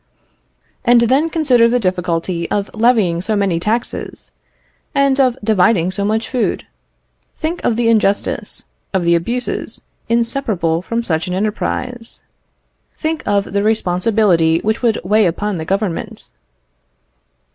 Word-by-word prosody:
And 240 Hz, 0 st, +5 dB
then 270 Hz, +7 st, +2 dB
consider 270 Hz, -8 st, +3 dB
the 245 Hz, +1 st, +2 dB
difficulty 180 Hz, -3 st, -1 dB
of 205 Hz, -1 st, -2 dB
levying 220 Hz, -7 st, +2 dB
so 215 Hz, +3 st, -1 dB
many 195 Hz, -5 st, +1 dB
taxes, 220 Hz, +6 st, -3 dB, 0.6 s
and 275 Hz, -1 st, +3 dB
of 255 Hz, -2 st, +3 dB
dividing 195 Hz, -4 st, +3 dB
so 200 Hz, +1 st, -2 dB
much 220 Hz, +2 st, 0 dB
food. 250 Hz, -3 st, -1 dB, 0.7 s
Think 330 Hz, +2 st, -3 dB
of 230 Hz, -, +1 dB
the 235 Hz, 0 st, +1 dB
injustice, 210 Hz, -3 st, 0 dB, 0.3 s
of 185 Hz, -, +1 dB
the 170 Hz, 0 st, +3 dB
abuses 235 Hz, +9 st, -2 dB, 0.3 s
inseparable 230 Hz, -9 st, 0 dB
from 230 Hz, +5 st, -2 dB
such 160 Hz, -5 st, -1 dB
an 180 Hz, -, -2 dB
enterprise. 230 Hz, +4 st, -3 dB, 0.7 s
Think 315 Hz, 0 st, -2 dB
of 200 Hz, -1 st, 0 dB
the 200 Hz, -, +1 dB
responsibility 185 Hz, -4 st, +2 dB
which 220 Hz, +1 st, -1 dB
would 230 Hz, -3 st, +1 dB
weigh 210 Hz, +2 st, +3 dB
upon 195 Hz, +2 st, -2 dB
the 160 Hz, -, -4 dB
Government. 195 Hz, -1 st, -3 dB
215 Hz, 130 wpm, -17 LUFS, 180-235 Hz, 0.7 s, And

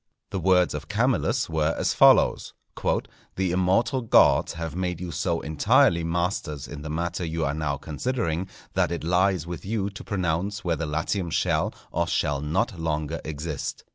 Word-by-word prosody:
The 95 Hz, -, -2 dB
words 90 Hz, 0 st, +3 dB
of 75 Hz, +1 st, -6 dB
Camillus 120 Hz, +3 st, +1 dB
were 80 Hz, 0 st, 0 dB
as -, -, +1 dB
follows: -, -, +4 dB, 0.8 s
"The 95 Hz, -2 st, 0 dB
immortal 95 Hz, +8 st, +2 dB
gods 115 Hz, -, +4 dB
have 80 Hz, -1 st, -5 dB
made 90 Hz, -2 st, -2 dB
you 90 Hz, -1 st, -5 dB
so 85 Hz, +1 st, -1 dB
entirely 85 Hz, -, +3 dB
masters 85 Hz, -4 st, -2 dB
in 75 Hz, +3 st, -8 dB
the 75 Hz, -, -6 dB
matter 85 Hz, +3 st, -2 dB
you 80 Hz, -1 st, -2 dB
are 70 Hz, -, 0 dB
now 75 Hz, -2 st, -2 dB
considering, 85 Hz, -, -2 dB, 0.3 s
that -, -, +2 dB
_it 85 Hz, -2 st, -4 dB
lies 90 Hz, 0 st, +2 dB
with 85 Hz, -2 st, -6 dB
you 100 Hz, -1 st, -2 dB
to 100 Hz, -, -9 dB
pronounce 95 Hz, +2 st, -2 dB
whether 85 Hz, -2 st, -1 dB
Latium 85 Hz, +4 st, -1 dB
shall -, -, +1 dB, 0.2 s
or 85 Hz, 0 st, 0 dB
shall 75 Hz, -4 st, 0 dB
not 90 Hz, +6 st, -1 dB
longer 80 Hz, 0 st, -2 dB
exist. 75 Hz, -1 st, -5 dB
85 Hz, 165 wpm, -25 LUFS, 80-95 Hz, 0.8 s, follows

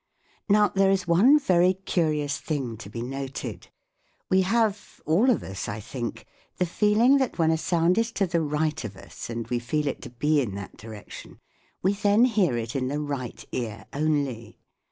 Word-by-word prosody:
Now 210 Hz, +1 st, +5 dB
there 195 Hz, 0 st, +3 dB
is 195 Hz, -1 st, +1 dB
one 210 Hz, -, +6 dB
very 185 Hz, -9 st, +3 dB
curious 155 Hz, -6 st, -1 dB
thing 135 Hz, -7 st, -3 dB
to 105 Hz, -2 st, -10 dB
be 115 Hz, +2 st, -5 dB
noted. 135 Hz, +1 st, -6 dB, 0.6 s
We 190 Hz, 0 st, +5 dB
have, 210 Hz, +1 st, 0 dB
all 190 Hz, +12 st, +3 dB
of 245 Hz, -, +2 dB
us 95 Hz, 0 st, -5 dB
I 105 Hz, +1 st, -4 dB
think, 120 Hz, +2 st, -6 dB, 0.3 s
the 180 Hz, -, +1 dB
feeling 215 Hz, +9 st, +4 dB
that 260 Hz, -3 st, -1 dB
when 160 Hz, -2 st, +3 dB
a -, -, +3 dB
sound 170 Hz, +4 st, +2 dB
is 230 Hz, 0 st, 0 dB
to 200 Hz, -, +1 dB
the 170 Hz, -2 st, 0 dB
right 150 Hz, -1 st, -1 dB
of 100 Hz, -4 st, -7 dB
us -, -, -9 dB
and 115 Hz, -1 st, -4 dB
we 120 Hz, 0 st, -1 dB
feel 150 Hz, +6 st, -1 dB
it 140 Hz, -, -3 dB
to -, -, -8 dB
be 145 Hz, +5 st, +1 dB
in 105 Hz, -7 st, -3 dB
that 100 Hz, -1 st, -8 dB
direction, 110 Hz, -2 st, -11 dB, 0.4 s
we 190 Hz, +2 st, +3 dB
then 205 Hz, +3 st, +4 dB
hear 200 Hz, -, +2 dB
it 115 Hz, +3 st, -4 dB
in 130 Hz, -1 st, 0 dB
the 145 Hz, +3 st, -2 dB
right 140 Hz, -5 st, -5 dB
ear 115 Hz, -4 st, -4 dB
only. 140 Hz, -6 st, -1 dB
155 Hz, 190 wpm, -26 LUFS, 125-195 Hz, 0.6 s, one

